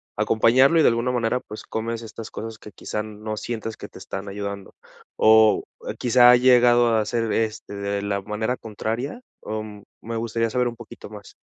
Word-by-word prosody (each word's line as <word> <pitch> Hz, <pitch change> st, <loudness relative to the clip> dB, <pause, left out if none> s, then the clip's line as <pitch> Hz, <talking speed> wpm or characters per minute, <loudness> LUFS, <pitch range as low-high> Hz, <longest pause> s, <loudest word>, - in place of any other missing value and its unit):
acompañarlo 130 Hz, +8 st, +4 dB
y -, -, +6 dB
de -, -, +5 dB
alguna 120 Hz, +2 st, +1 dB
manera, 125 Hz, 0 st, 0 dB
pues, 105 Hz, -, -10 dB
comes 115 Hz, +1 st, -4 dB
estas 110 Hz, 0 st, -9 dB
cosas 110 Hz, 0 st, -7 dB
que 105 Hz, -, -13 dB
quizá 105 Hz, +2 st, -5 dB
no 110 Hz, 0 st, -6 dB
sientas 115 Hz, 0 st, -5 dB
que -, -, -10 dB
te -, -, -13 dB
están 100 Hz, +1 st, -6 dB
ayudando, 100 Hz, -1 st, -6 dB, 0.4 s
¿o 110 Hz, -1 st, +5 dB, 0.4 s
quizá 125 Hz, 0 st, +6 dB
ha 125 Hz, -, +7 dB
llegado 120 Hz, -2 st, +5 dB
a 110 Hz, -1 st, +1 dB
ser, 115 Hz, 0 st, -1 dB
este, 110 Hz, -2 st, -2 dB
de 100 Hz, 0 st, -3 dB
la 100 Hz, -1 st, -2 dB
manera 110 Hz, +5 st, -2 dB
contraria? 115 Hz, -, -4 dB, 0.2 s
O 110 Hz, 0 st, -4 dB, 0.4 s
me 115 Hz, +1 st, -6 dB
gustaría 115 Hz, 0 st, -1 dB
saber 125 Hz, +1 st, 0 dB
un 115 Hz, -, -10 dB
poquito 115 Hz, -3 st, -11 dB
más. 105 Hz, -2 st, -12 dB
110 Hz, 185 wpm, -23 LUFS, 105-120 Hz, 0.4 s, ha